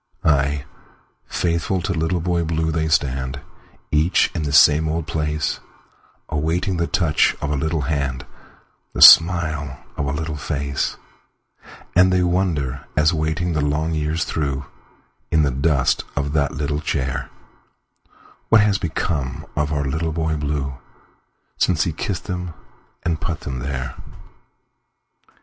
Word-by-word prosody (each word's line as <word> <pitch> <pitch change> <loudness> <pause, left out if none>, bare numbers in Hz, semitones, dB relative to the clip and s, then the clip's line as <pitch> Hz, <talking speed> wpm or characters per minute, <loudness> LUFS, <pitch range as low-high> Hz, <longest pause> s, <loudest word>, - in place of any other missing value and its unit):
Ay, 70 -2 +1 0.6
faithful 85 +2 -1
to 90 +2 -2
Little 80 +1 -1
Boy 85 0 0
Blue 80 0 -1
they 80 0 0
stand, 65 -3 0 0.5
Each 75 +4 +3
in 85 - -2
the 75 -2 -2
same 75 +2 +5
old 80 0 -2
place, 75 -2 -2 0.7
Awaiting 85 +5 -1
the 85 0 0
touch 85 -6 +2
of 75 - -3
a - - +1
little 80 +3 -1
hand, 70 -2 -2 0.7
The - - +5
smile 80 -5 +7 0.2
of 70 - -2
a - - 0
little 75 +1 -3
face; 70 -2 -2 1.0
And 90 +1 +6
they 90 -1 +3
wonder, 85 -7 -1
as 75 +3 +4
waiting 80 +2 -1
the 75 - 0
long 75 +3 0
years 80 +1 -1
throughIn 70 -3 -2 0.8
the 70 - +1
dust 70 0 +1
of 70 0 -2
that 70 -2 +1
little 75 +1 -2
chair, 65 -5 -2 1.2
What 115 -2 +6
has 100 -1 +2
become 80 -7 -2
of 75 0 0
our 70 -2 -1
Little 80 +4 -1
Boy 80 -1 -1
Blue, 70 -3 -3 0.8
Since 85 -5 +2
he 85 - -2
kissed 85 +3 -3
them 90 -2 -5 0.5
and 80 -2 -1
put 85 0 -3
them 65 -2 -5
there. 65 -1 -4
75 Hz, 135 wpm, -21 LUFS, 70-85 Hz, 1.2 s, smile